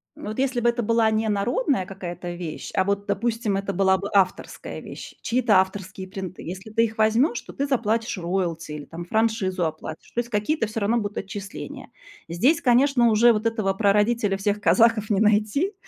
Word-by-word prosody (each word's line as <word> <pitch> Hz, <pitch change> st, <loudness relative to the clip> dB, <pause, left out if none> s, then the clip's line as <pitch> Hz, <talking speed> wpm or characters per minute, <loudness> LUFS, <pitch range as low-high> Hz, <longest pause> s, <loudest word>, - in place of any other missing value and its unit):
вот 215 Hz, +3 st, -7 dB
если 260 Hz, -2 st, +1 dB
бы 240 Hz, 0 st, +3 dB
это 240 Hz, 0 st, -1 dB
была 230 Hz, 0 st, +3 dB
не 220 Hz, 0 st, 0 dB
народная 210 Hz, +1 st, 0 dB
какая-то 175 Hz, -2 st, -6 dB
вещь, 170 Hz, -3 st, -6 dB
а 190 Hz, -, +2 dB
вот, 200 Hz, +1 st, -1 dB
допустим, 220 Hz, +1 st, -1 dB
это 195 Hz, 0 st, -3 dB
была 190 Hz, 0 st, +3 dB
бы 200 Hz, +2 st, -5 dB
авторская 190 Hz, -2 st, 0 dB
вещь, -, -, -9 dB
чьи-то 230 Hz, -5 st, +3 dB
авторские 190 Hz, 0 st, -6 dB
принты. 190 Hz, -1 st, -7 dB
Если 190 Hz, +5 st, -7 dB
ты 230 Hz, +1 st, +3 dB
их 220 Hz, +1 st, -6 dB
возьмёшь, 230 Hz, +4 st, +3 dB
то -, -, -12 dB
ты 280 Hz, +1 st, -2 dB
заплатишь 230 Hz, -4 st, 0 dB
роялти 170 Hz, -3 st, -2 dB
или 150 Hz, -1 st, -7 dB
там 170 Hz, +1 st, -8 dB
франшизу 195 Hz, -4 st, 0 dB
оплатишь, 155 Hz, 0 st, -6 dB
то 240 Hz, -, -2 dB
есть 240 Hz, 0 st, -2 dB
какие-то 220 Hz, +4 st, 0 dB
всё 225 Hz, +1 st, -4 dB
равно 225 Hz, +4 st, +2 dB
будут 205 Hz, -2 st, -3 dB
отчисления. 200 Hz, 0 st, -8 dB, 0.4 s
Здесь, 235 Hz, -, +2 dB
конечно, 250 Hz, -1 st, +4 dB
уже 230 Hz, +2 st, +5 dB
вот 215 Hz, 0 st, -1 dB
этого 215 Hz, -4 st, 0 dB
прародителя 205 Hz, +1 st, +2 dB
всех 205 Hz, +1 st, -1 dB
казахов 225 Hz, -1 st, +3 dB
не 200 Hz, -2 st, +2 dB
найти. 215 Hz, -, +2 dB
210 Hz, 185 wpm, -24 LUFS, 190-230 Hz, 0.4 s, уже